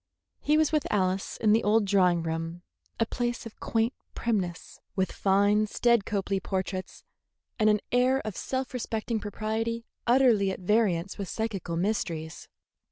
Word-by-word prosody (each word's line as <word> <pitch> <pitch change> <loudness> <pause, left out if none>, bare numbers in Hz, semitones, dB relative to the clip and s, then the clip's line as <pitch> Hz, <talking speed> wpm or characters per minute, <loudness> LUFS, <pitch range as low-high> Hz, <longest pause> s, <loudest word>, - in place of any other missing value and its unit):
He 300 +1 +2
was 315 -1 +3
with 305 -3 0
Alice 190 -1 0
in 215 - +3
the 225 - +3
old 210 +1 +3
drawing 180 -4 +3
room, 165 +2 -4 0.4
a 225 - +3
place 240 +1 -3
of 225 - -10
quaint 230 +2 0 0.2
primness, 190 -7 -2 0.2
with 190 -2 0
fine, 205 +2 +3
staid 235 -1 +2
Copley 195 -2 -1
portraits, 190 -1 -4 0.6
and 215 0 +5
an 210 -1 +3
air 255 +2 +3
of 215 -3 -4
self 260 0 -3
respecting 225 -2 -2
propriety 220 +2 -3 0.2
utterly 240 -5 +4
at 190 - -4
variance 195 -2 +1
with 195 -3 -4
psychical 200 -7 -3
mysteries. 165 -5 -2
210 Hz, 150 wpm, -28 LUFS, 190-230 Hz, 0.6 s, and